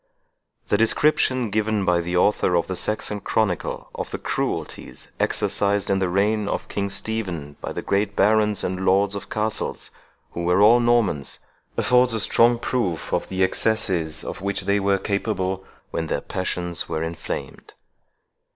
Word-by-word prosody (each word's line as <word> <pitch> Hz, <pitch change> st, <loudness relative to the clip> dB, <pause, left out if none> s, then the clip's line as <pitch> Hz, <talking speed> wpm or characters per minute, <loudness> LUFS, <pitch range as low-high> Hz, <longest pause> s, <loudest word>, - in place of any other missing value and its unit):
The 105 Hz, -, +3 dB
description 130 Hz, -1 st, +2 dB
given 110 Hz, -1 st, 0 dB
by 90 Hz, -2 st, +3 dB
the 90 Hz, +1 st, -2 dB
author 90 Hz, -1 st, +3 dB
of 85 Hz, -, +2 dB
the 95 Hz, -, -4 dB
Saxon 105 Hz, +1 st, -2 dB
Chronicle 100 Hz, -3 st, -1 dB
of -, -, -5 dB
the -, -, -4 dB
cruelties -, -, -4 dB
exercised 100 Hz, -1 st, +1 dB
in 95 Hz, -, +2 dB
the 95 Hz, -2 st, 0 dB
reign 105 Hz, +3 st, +1 dB
of -, -, -3 dB
King 100 Hz, 0 st, -2 dB
Stephen 95 Hz, -10 st, -3 dB
by -, -, -4 dB
the -, -, -5 dB
great 100 Hz, +1 st, 0 dB
barons 105 Hz, 0 st, +3 dB
and 95 Hz, +1 st, -2 dB
lords 100 Hz, +1 st, +3 dB
of 100 Hz, -, -5 dB
castles, 110 Hz, 0 st, -2 dB, 0.4 s
who 85 Hz, -, -4 dB
were 90 Hz, +2 st, +3 dB
all 110 Hz, +4 st, +7 dB
Normans, 115 Hz, -, +1 dB, 0.4 s
affords 125 Hz, -1 st, +4 dB
a -, -, 0 dB
strong 120 Hz, +3 st, +4 dB
proof 110 Hz, -, -2 dB
of -, -, -1 dB
the 95 Hz, 0 st, 0 dB
excesses 90 Hz, -7 st, +1 dB
of -, -, -6 dB
which 100 Hz, 0 st, -1 dB
they 100 Hz, +1 st, +1 dB
were 100 Hz, 0 st, +2 dB
capable 95 Hz, -2 st, -2 dB, 0.3 s
when 80 Hz, -, -2 dB
their -, -, -1 dB
passions 90 Hz, -2 st, -3 dB
were 80 Hz, -, -2 dB
inflamed. 80 Hz, 0 st, -6 dB
100 Hz, 160 wpm, -23 LUFS, 90-110 Hz, 0.4 s, all